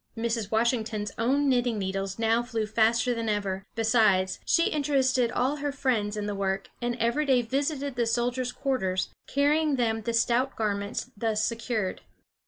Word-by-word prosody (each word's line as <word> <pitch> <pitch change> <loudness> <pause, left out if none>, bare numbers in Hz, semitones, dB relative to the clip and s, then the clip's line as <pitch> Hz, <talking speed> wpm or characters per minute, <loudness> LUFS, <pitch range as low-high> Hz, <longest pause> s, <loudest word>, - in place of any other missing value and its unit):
Mrs. 225 -2 -1
Washington's 220 -2 0
own 275 +5 +2
knitting 245 -3 +2
needles 195 0 -3
now 225 +1 +2
flew 230 -2 -2
faster 225 +2 +2
than 230 -1 -2
ever; 200 -2 -2
besides, 215 -5 +3
she 335 - +3
interested 265 -4 +2
all 265 +4 0
her 290 0 -2
friends 225 -7 -1
in 210 - -2
the 205 - -2
work, 195 -1 -2
and 240 0 -1
every 235 +5 +1
day 260 -4 +3
visited 280 +2 -2
the 235 -1 0
soldiers' 245 +2 0
quarters, 190 -10 -1 0.2
carrying 295 +1 +2
them 225 -3 0
the 235 +2 -3
stout 245 +3 +1
garments 200 -2 -2
thus 215 0 0
secured. 230 -4 -2
230 Hz, 160 wpm, -27 LUFS, 215-255 Hz, 0.2 s, besides